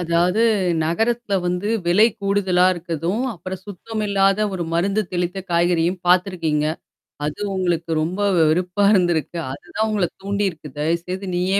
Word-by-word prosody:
அதாவது 175 +4 +1 0.4
நகரத்தல 225 +5 0
வந்து 180 +4 -1 0.2
விலை 200 +6 +5
கூடுதலா 195 -2 +2
இருக்கதும், 175 +4 -3
அப்புறம் 185 +2 -7
சுத்தம் 215 +3 -5
இல்லாத 195 0 +3
ஒரு 180 -3 -2
மருந்து 195 +5 +1
தெளித்த 180 +2 -1
காய்கறியும் 175 +1 +1
பாத்துருக்கீங்க. 175 -5 +2 0.6
அது 150 +5 -4
உங்களுக்கு 175 -3 -1
ரொம்ப 180 +6 -2 0.2
வெறுப்பா 180 +5 +2
இருந்திருக்கு. 175 -3 +1
அதுதான் 215 +10 -3
உங்கள 205 -5 +1 0.2
தூண்டியிருக்கு. 195 -6 -2
தயவுசய்து 170 +5 -2
நீயே 185 +3 +1
180 Hz, 125 wpm, -21 LUFS, 170-200 Hz, 0.6 s, விலை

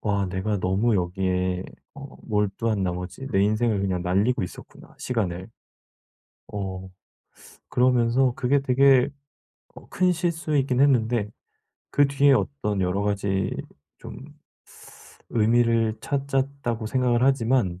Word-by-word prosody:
'와 100 -2 0
내가 95 +3 -2
너무 95 +6 +1
여기에 90 0 -1 0.3
어 140 -1 -11
몰두한 105 0 -1
나머지 90 +7 -4
내 95 - +2
인생을 110 0 +1
그냥 95 -2 -1
날리고 100 +6 +1
있었구나, 90 - -10
시간을.' 95 -6 -3 1.0
어 95 -2 -6 0.8
그러면서 125 0 +2
그게 140 +2 +2
되게 135 -1 +4 0.7
어 - - -14
큰 180 0 +2
실수이긴 155 -6 0
했는데 120 -6 +2 0.6
그 145 0 +4
뒤에 140 0 +3
어떤 115 -7 -1
여러 95 +2 0
가지 100 -2 -1 0.5
좀 - - -10 1.1
의미를 115 0 +2
찾았다고 135 -4 -2
생각을 125 0 +1
하지만 120 -8 +1
115 Hz, 245 characters per minute, -24 LUFS, 95-130 Hz, 1.1 s, 되게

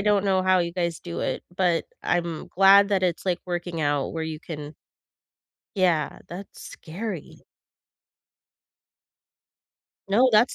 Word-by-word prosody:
don't 205 -1 +2
know 190 -1 +2
how 185 0 +4
you 170 -1 -1
guys 170 -2 -2
do 170 -1 -5
it, - - -2
but 175 -3 +2 0.2
I'm 170 -2 -1
glad 195 +2 +6
that 195 -2 +1
it's, 180 -1 0
like, 180 -2 +1
working 175 -2 -3
out 145 -2 0
where 165 -1 -3
you 160 -1 -5
can 150 -2 -7 1.0
Yeah, 175 -6 +1
that's 190 +3 -9
scary. 180 0 -7 2.6
No, 240 +6 +5
that's 220 +4 +4
175 Hz, 130 wpm, -25 LUFS, 165-195 Hz, 2.6 s, glad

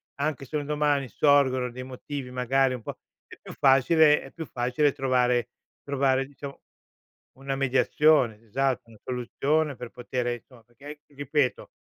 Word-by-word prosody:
anche 140 -1 -2
se 155 - -8
un 145 - -3
domani 145 -3 0
sorgono 130 -2 +3
dei 130 +1 -7
motivi 130 0 -7
magari 130 +1 +1
un 115 - -10
po' - - -7 0.3
è - - -13
più - - -10
facile 150 +3 +4
è 135 - -12
più 165 -2 -7
facile 125 +4 0
trovare 125 -3 +1 0.3
trovare 135 -1 +1
diciamo 140 0 -10 0.8
una 135 0 -3
mediazione 135 -2 +3
esatto, 130 +1 -1
una 110 - -17
soluzione 140 +4 -1
per 120 -1 -8
potere 120 0 -3
insomma 120 0 -16
perché 120 +5 -20
anch 150 0 -8
ripeto 145 -2 -2
135 Hz, 150 wpm, -26 LUFS, 125-145 Hz, 0.8 s, facile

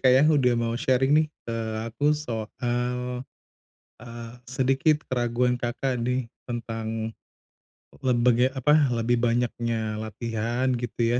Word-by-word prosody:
Kak, 130 -1 +5
ya, 130 - +6
udah 135 -5 +4
mau 115 0 0
sharing 130 +2 +2
nih 155 - +3 0.2
ke 115 -1 -3 0.4
aku 145 +5 +2
soal, 115 -7 -4 0.2
eee, 125 +1 -2 1.0
sedikit 135 +4 +2
keraguan 125 0 +1
Kakak 125 +2 -2
nih, 125 -1 -1 0.2
tentang 115 -2 -3 0.9
lebege 125 -1 +4
apa, 150 +3 +4 0.2
lebih 115 +1 +1
banyaknya 115 -2 0
latihan 115 +3 -2
gitu 120 0 0
120 Hz, 115 wpm, -26 LUFS, 115-130 Hz, 1.0 s, ya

